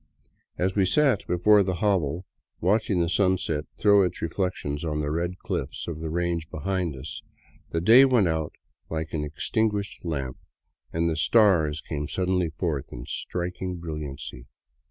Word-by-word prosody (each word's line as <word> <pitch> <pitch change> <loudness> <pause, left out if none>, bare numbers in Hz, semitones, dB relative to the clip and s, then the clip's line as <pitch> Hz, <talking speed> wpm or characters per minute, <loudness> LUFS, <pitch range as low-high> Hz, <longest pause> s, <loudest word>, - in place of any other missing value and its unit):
As 95 +1 +1
we 95 -2 +3
sat 135 -2 +2
before 100 +4 +5
the 95 -1 0
hovel 90 -3 0 0.3
watching 100 +1 +2
the 85 - +1
sunset 90 -5 +1
throw 100 -1 +5
its 90 -2 0
reflections 85 -4 -2
on 75 -2 -1
the 75 0 -1
red 85 +3 -2
cliffs - - -4
of 80 -2 -4
the 80 0 -4
range 85 -1 -1
behind 90 0 -2
us, 75 +4 -7 0.5
the 80 - -1
day 115 +9 +8
went 125 -8 +4
out 80 -2 -1 0.4
like 80 0 -4
an 75 -2 -1
extinguished 105 +7 -1
lamp 70 -7 -3 0.5
and 85 +1 0
the 80 - 0
stars 80 -3 +3
came 75 -2 -4
sud 90 -1 -1
denly 90 -3 +1
forth 75 -4 -3
in - - -7
striking 90 +1 -4
brilliancy. 75 -7 -6
85 Hz, 155 wpm, -26 LUFS, 75-95 Hz, 0.5 s, day